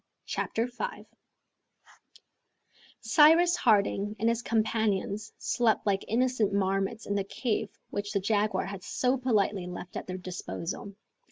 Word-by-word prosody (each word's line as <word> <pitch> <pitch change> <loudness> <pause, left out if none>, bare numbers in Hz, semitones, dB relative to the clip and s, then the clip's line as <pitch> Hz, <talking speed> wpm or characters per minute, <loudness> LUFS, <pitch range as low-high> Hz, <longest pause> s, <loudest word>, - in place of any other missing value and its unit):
Chapter 230 +2 -1
5 485 - -5 2.0
Cyrus 320 +9 +6
Harding 205 -2 +2
and 225 +3 +2
his 230 0 0
companions 215 -3 0
slept 230 -3 +1
like 195 -2 +1
innocent 240 -3 +1
marmots 195 +2 0
in 200 - -2
the 200 -1 0
cave 215 +3 -2 0.2
which 205 0 -3
the 200 - +1
jaguar 210 +2 +1
had 195 -1 -7
so 255 +1 +1
politely 210 -7 0
left 180 0 -8
at - - -5
their 185 0 -4
disposal. 185 +1 -6
210 Hz, 125 wpm, -29 LUFS, 195-235 Hz, 2.0 s, Cyrus